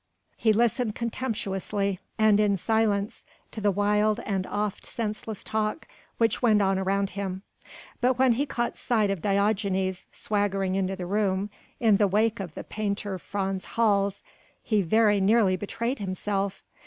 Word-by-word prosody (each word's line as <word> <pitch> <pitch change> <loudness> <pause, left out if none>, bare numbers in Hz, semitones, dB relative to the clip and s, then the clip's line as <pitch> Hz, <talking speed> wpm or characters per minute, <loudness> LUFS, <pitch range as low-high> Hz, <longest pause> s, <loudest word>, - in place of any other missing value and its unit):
He 220 - +2
listened 230 0 +1
contemptuously 205 -5 -2 0.2
and 215 -1 +4
in 205 -2 +3
silence 215 0 0 0.3
to 220 - -6
the 205 - +3
wild 210 +2 +2
and 195 -4 -2
oft 205 -1 -2
senseless 215 -2 -4
talk 215 +6 -2 0.3
which 230 -1 +1
went 220 -4 +4
on 195 -1 +2
around 195 +1 0
him; 190 0 -4 0.6
but 250 0 +2
when 260 -1 +4
he 275 +5 0
caught 240 -3 -2
sight 215 -4 +1
of 195 -4 -3
Diogenes 195 -2 0
swaggering 195 -2 -1
into 190 0 0
the 185 -2 -5
room 200 +1 0 0.3
in 220 -4 +4
the 205 -1 +3
wake 215 +3 +1
of 175 -5 -6
the - - -6
painter 205 -2 -3
Frans 195 0 -3
Hals 200 -3 +2 0.4
he 215 -3 +2
very 205 +2 +3
nearly 200 -1 +4
betrayed 230 +7 -3
himself. 195 0 -2
205 Hz, 150 wpm, -26 LUFS, 195-220 Hz, 0.6 s, and